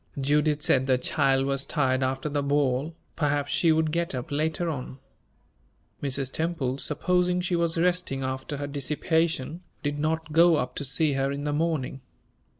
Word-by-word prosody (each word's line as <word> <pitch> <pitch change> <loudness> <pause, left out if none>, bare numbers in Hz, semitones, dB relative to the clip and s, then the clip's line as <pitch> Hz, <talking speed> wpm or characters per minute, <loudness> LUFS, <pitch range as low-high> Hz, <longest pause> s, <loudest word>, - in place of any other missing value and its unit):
Judith 150 +2 +1
said 130 0 +3
the 130 -1 +4
child 135 +1 +2
was 135 0 -1
tired 130 -3 +1
after 130 +2 -1
the 145 -1 -1
ball; 140 +1 0 0.2
perhaps 145 -2 0
she 165 - +3
would 160 0 +2
get 170 -3 -1
up 125 +2 -5
later 155 +3 -1
on. 135 -4 -4 1.0
Mrs. 135 -1 -1
Temple, 150 -6 -2
supposing 180 +4 +1
she 180 0 0
was 170 -1 +1
resting 175 -6 0
after 130 +2 -4
her 145 - -3
dissipation, 155 +2 -1 0.2
did 145 0 -2
not 155 +1 -1
go 170 +1 +6
up 125 -3 -2
to - - -2
see 145 +2 +1
her 135 0 0
in 140 +1 -4
the 145 0 -1
morning. 150 -4 -1
145 Hz, 165 wpm, -26 LUFS, 135-160 Hz, 1.0 s, go